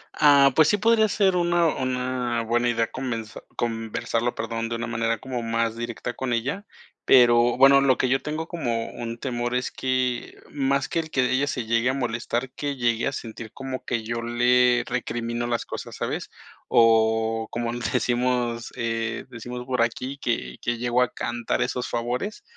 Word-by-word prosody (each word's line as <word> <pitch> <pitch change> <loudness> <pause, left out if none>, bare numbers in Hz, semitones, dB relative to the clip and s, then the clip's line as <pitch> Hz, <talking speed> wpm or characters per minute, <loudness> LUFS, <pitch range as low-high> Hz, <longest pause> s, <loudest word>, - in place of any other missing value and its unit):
Ah, 140 -2 +6
pues 155 0 +6
sí 205 - +3
podría 220 +1 +4
ser 195 -2 +2
una 175 -1 +2
una 125 -2 -1
buena 120 +2 +1
idea 115 -1 +1
conver 120 -4 -3 0.3
conversarlo, 115 +1 -2
perdón, 115 0 -3
de 115 - -2
una 115 0 -3
manera 115 0 -1
como 125 +1 -5
más 115 0 -1
directa 120 +1 -5
con 130 -1 -3
ella, 140 - -2 0.4
pero 120 -1 +5
bueno, 135 +1 +7
lo 135 -2 +3
que - - +1
yo 135 +1 +2
tengo 155 +2 -4
como 120 -10 -2
un 115 -1 -6
temor 120 -1 -2
es 125 0 -1
que 130 -2 -2
más 140 -1 0
que - - -1
el 160 -1 -4
que 130 -3 +1
ella 135 +2 +2
se 125 -5 -2
llegue 115 +2 +2
a 130 - +1
molestar, 120 0 -2
que 145 +1 -3
llegue 120 -2 0
a - - 0
sentir 115 -4 -7
como 135 -1 -6
que 115 -2 -1
yo 115 +1 -3
le 125 +1 +3
recrimino 120 -1 -3
las 120 -1 -1
cosas, - - -7
¿sabes? - - -3 0.4
O 110 -1 +3
como 120 0 -2
decimos, 120 -1 -1
eh, 115 -1 -2
decimos 125 +1 -7
por 125 -2 0
aquí, 130 +4 -2
que 120 -4 -2
que 120 0 -1
llegó 120 +1 +1
a 125 - +1
cantar 120 -1 -2
esos 125 0 -3
favores, 125 - -3
120 Hz, 175 wpm, -25 LUFS, 115-130 Hz, 0.4 s, bueno